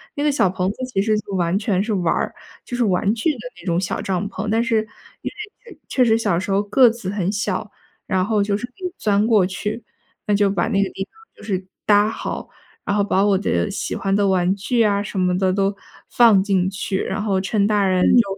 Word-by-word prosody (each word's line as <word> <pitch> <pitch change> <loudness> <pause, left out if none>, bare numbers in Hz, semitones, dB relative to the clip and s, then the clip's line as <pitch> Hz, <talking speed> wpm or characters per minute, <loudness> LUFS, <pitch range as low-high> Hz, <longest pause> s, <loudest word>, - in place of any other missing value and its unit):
那 290 - -2
个 300 - +3
小 195 -9 +2
棚 185 0 -1
子 - - -11
其 240 -6 -1
实 215 +1 +1
就 200 -1 -8
完 175 +1 +1
全 200 -3 0
是 215 0 -2
玩 180 -4 +1
儿， - - -2 0.3
就 245 - -5
是 245 - +2
玩 195 +2 +1
具 235 +8 0
的 - - -10 0.2
那 - - -15
种 170 -2 +1
小 185 - -2
帐 195 +1 -2
篷， 205 +1 -4
但 225 +1 +2
是 230 -2 +1 0.4
因 - - -3
为 430 +3 -11
确 255 - +2
确 - - +3
实 225 -1 +4
小 205 -6 0
时 190 +2 -4
候 195 +1 +3
个 235 +5 +5
子 225 -4 -5
很 195 -2 -1
小， 205 -1 -2 0.4
然 185 -1 +1
后 210 -1 +1
就 200 0 0
是 240 - -4
可 250 - -33
以 360 - -4
钻 205 0 +2
过 215 -5 +4
去。 210 +4 -4 0.5
那 205 - +3
就 200 -1 +3
把 190 -3 0
那 200 -3 +2
个 - - -2
地 195 - -5
方 - - -46 0.2
就 - - -14
是 190 -3 -3 0.2
搭 205 0 +4
好， 225 - -5 0.4
然 200 - 0
后 210 - +2
把 195 -1 +2
我 200 -2 +3
的 200 +1 0
喜 200 - -3
欢 195 0 -1
的 205 -1 +2
玩 185 -1 +2
具 230 +4 +1
啊 200 -1 +2
什 205 - -6
么 180 0 +1
的 185 -1 +1
都 195 +1 +1 0.4
放 225 -5 +5
进 190 -2 +1
去， 190 0 -3
然 210 +2 -3
后 195 -3 +1
趁 200 +1 +1
大 205 -1 +2
人 185 -1 +2
就， 240 - +6
200 Hz, 265 characters per minute, -21 LUFS, 190-215 Hz, 0.5 s, 就